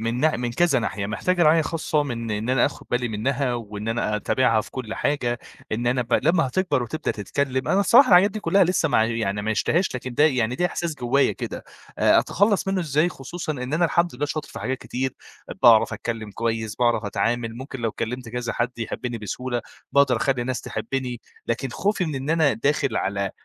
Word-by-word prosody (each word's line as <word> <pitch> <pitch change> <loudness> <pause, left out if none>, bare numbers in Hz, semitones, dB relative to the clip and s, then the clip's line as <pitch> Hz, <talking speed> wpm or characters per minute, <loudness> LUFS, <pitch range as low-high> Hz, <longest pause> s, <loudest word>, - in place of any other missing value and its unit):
من 115 +2 -2
نح 155 0 +3
من 120 +1 -2
كذا 155 +1 +3
ناحية، 105 -3 -3
محتاجة 175 - 0
رعاية 160 0 +5
خاصة 155 -1 0
من 115 -5 -4
إن 105 +3 -2
أنا 130 -2 +4
آخد - - -7
بالي 125 0 0
منها، 125 +4 -1
وإن 105 -2 -6
أنا 115 -2 0
أتابعها 115 +1 +2
في - - -10
كلّ 115 -4 -5
حاجة، 120 -4 -1 0.3
إن 120 +2 -1
أنا 125 +1 +2
ب 120 - -10
لمّا 165 0 +3
هتكبر 180 -2 0
وتبدأ 155 +8 -3
تتكلّم، 130 +6 -2
أنا 195 - +3
الصراحة 245 +7 +6
الحاجات 185 +3 +6
دي 215 +1 -5
كلّها 195 -2 +4
لسّه 175 -2 +1
ما 125 - +3
ع 110 - +4
يعني 110 -3 -1
ما 110 - -3
عيشتهاش 165 - +1
لكن 125 0 -5
ده، 150 - +4
يعني 125 -5 +2
ده 175 +7 +1
إحساس 170 -2 -3
جوايا 135 +1 +2
كده، - - -6 0.3
أ - - +5
أتخلّص 200 0 +1
منُّه 195 -1 +1
ازاي 155 +1 +1
خصوصًا 160 +2 -5
إن 125 -1 -5
أنا 170 +2 +2
الحمد 170 -1 +1
لله 145 +4 -2
شاطر 150 0 -4
في - - -8
حاجات 130 +3 -2
كتير، 130 +1 -3 0.5
باعرف - - +6
اتكلّم 110 -3 -4
كويس 110 0 -2
باعرف 120 -2 +2
اتعامِل 115 +2 -1
ممكن 130 +1 -7
لو 115 -1 0
تكّلمت 125 +3 -5
كذا 120 0 -3
حد 120 0 -2
يحبّني 115 +1 -4
بسهولة، 120 +4 -3 0.3
باقدر 140 -3 +4
اخلّي 130 +2 0
الناس 130 +1 -2
تحبّني، 125 +2 -4 0.3
لكن 115 +3 -1
خوفي 205 - 0
من 155 -3 -3
إن 135 +3 -3
أنا 160 -4 +3
داخل 140 -1 0
على 100 0 -1
125 Hz, 205 wpm, -24 LUFS, 115-155 Hz, 0.5 s, الصراحة